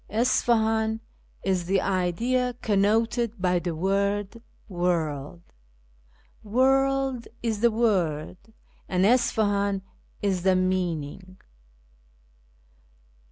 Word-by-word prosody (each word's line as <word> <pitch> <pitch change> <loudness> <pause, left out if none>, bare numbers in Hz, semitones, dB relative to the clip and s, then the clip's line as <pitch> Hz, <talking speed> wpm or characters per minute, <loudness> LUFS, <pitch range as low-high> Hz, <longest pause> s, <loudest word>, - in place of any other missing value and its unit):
Isfahan 220 -1 +1 0.4
is 185 -2 0
the 195 +1 +2
idea 230 +8 0
connoted 225 +2 +1
by 180 -1 +2
the 170 -1 -3
word 200 +4 -1 0.2
' - - -36
world 170 -4 -2 0.4
'; - - -35
' - - -33
Workl' 270 +2 +2 0.2
is 225 -3 -1
the 235 - +5
word, 185 -9 0 0.5
and 185 0 +2
Isfahan 205 -4 +2 0.4
is 195 -3 0
the 190 +1 +3
meaning." 185 -1 -2
200 Hz, 95 wpm, -26 LUFS, 180-230 Hz, 0.5 s, the